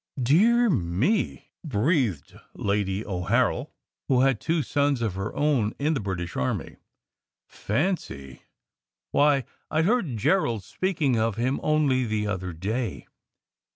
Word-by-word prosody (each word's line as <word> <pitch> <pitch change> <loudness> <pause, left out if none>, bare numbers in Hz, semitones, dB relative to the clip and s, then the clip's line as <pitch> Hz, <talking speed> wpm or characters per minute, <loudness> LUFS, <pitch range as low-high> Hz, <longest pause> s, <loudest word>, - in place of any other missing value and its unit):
"Dear 215 - +4
me!" 130 - 0
breathed 120 - 0 0.2
Lady 100 0 -1
O 90 -3 -3
Harrel, - - +1 0.4
who 130 -2 +3
had 135 -4 +2
two 165 -1 0
sons 140 0 +1
of 110 -5 -1
her 95 +3 -4
own 135 -8 +1
in 150 +3 +1
the 140 - -1
British 95 -4 -4
army. 65 - -2 0.7
"Fancy! 105 - -3 0.7
Why, 145 -2 +3 0.3
I 160 +1 +1
heard 180 - +1
Gerald 115 - +1
speaking 155 - 0
of 110 -1 0
him 125 +4 0
only 150 -4 +2
the 110 -1 -1
other 95 -3 -3
day. 105 +7 -3
125 Hz, 125 wpm, -26 LUFS, 100-150 Hz, 0.7 s, Dear